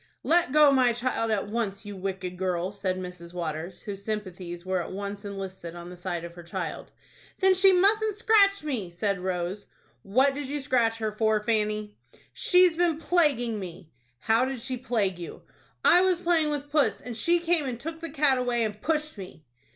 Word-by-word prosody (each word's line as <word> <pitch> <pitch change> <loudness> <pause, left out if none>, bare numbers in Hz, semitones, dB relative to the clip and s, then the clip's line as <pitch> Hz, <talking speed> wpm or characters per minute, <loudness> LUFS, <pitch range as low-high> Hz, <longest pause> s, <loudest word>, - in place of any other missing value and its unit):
"Let 335 -5 +3
go 300 0 +6
my 255 -3 +4
child 235 -1 -1
at 210 -2 0
once, 210 -2 -3
you 205 -1 -7
wicked 190 -1 -4
girl!" 180 0 -1
said 190 -2 -2
Mrs. 180 -1 -8
Waters, 165 +1 -4
whose 200 -1 -7
sympathies 185 -5 -5
were 185 -1 0
at - - -7
once 200 +1 -5
enlisted 190 -4 -6
on 175 +1 -9
the - - -9
side 175 -1 -4
of 170 0 -8
her 175 - -10
child. 170 0 -5 0.5
"Then 380 -1 +5
she 380 +1 +6
mustn't 415 +3 +3
scratch 400 -4 +4
me," 245 - -3
said 195 +3 -1
Rose. 185 +2 -3 0.3
"What 260 - +3
did 285 -1 -5
you 290 +2 -3
scratch 240 -4 +1
her 220 -1 -2
for, 220 0 +1
Fanny?" 210 -1 -1 0.3
"She's 360 -2 +4
been 340 -2 +2
plaguing 290 -10 +1
me." 175 -3 -9 0.3
"How 225 - +2
did 260 -3 -5
she 260 -1 -2
plague 220 -7 -1
you?" 170 - -8 0.4
"I 355 - +7
was 370 -2 +2
playing 335 -3 +2
with 290 -1 -4
puss, 295 -1 +2
and 245 -2 -7
she 340 +10 +2
came 335 -4 +1
and 240 -2 -4
took 325 +4 -6
the 330 - -5
cat 280 -3 +2
away, 245 -2 0
and 210 -1 -4
pushed 305 -6 -1
me." 180 -5 -10
220 Hz, 190 wpm, -27 LUFS, 185-295 Hz, 0.5 s, I